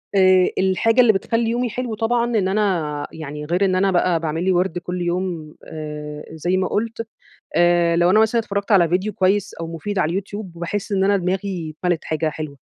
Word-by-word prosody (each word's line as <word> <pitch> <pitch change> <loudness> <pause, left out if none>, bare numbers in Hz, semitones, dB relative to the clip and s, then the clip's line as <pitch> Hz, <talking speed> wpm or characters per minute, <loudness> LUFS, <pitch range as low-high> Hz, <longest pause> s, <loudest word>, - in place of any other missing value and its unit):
آآ 185 -1 +5
الحاجة 190 +6 +3
اللي 235 -3 +5
بتخلّي 230 +4 0
يومي 245 +1 0
حلو 240 0 -4
طبعًا 235 +2 +1
إن 220 -6 0
أنا 180 -8 0
يعني 150 -1 -7
غير 175 +5 +1
إن 185 -1 +1
أنا 195 +1 +2
بقى 175 -1 +2
باعمل 160 +1 -2
لي 190 - +2
وِرْد 180 -1 +1
كُل 180 +1 -5
يوم 175 -3 -3
آآ 150 -1 -7
زي 175 +4 -1
ما 185 - 0
قُلت، 230 +1 -2 0.5
آآ 175 -1 +4
لو 175 +1 +4
أنا 215 +3 +5
مثلًا 220 +1 +3
اتفرّجْت 200 -1 -3
على 175 -4 +5
فيديو 185 +5 0
كويس 195 +2 +1
أو 165 - -6
مفيد 170 +5 -4
على 160 -4 +1
اليوتيوب، 200 +1 -5
باحس 185 +4 -3
إن 190 -1 +2
أنا 200 +1 +3
دماغي 185 -3 -3
اتملِت 175 -2 0
حاجة 155 - -2
حاجة 160 0 0
حلوة، 150 -3 -7
185 Hz, 205 wpm, -21 LUFS, 170-205 Hz, 0.5 s, آآ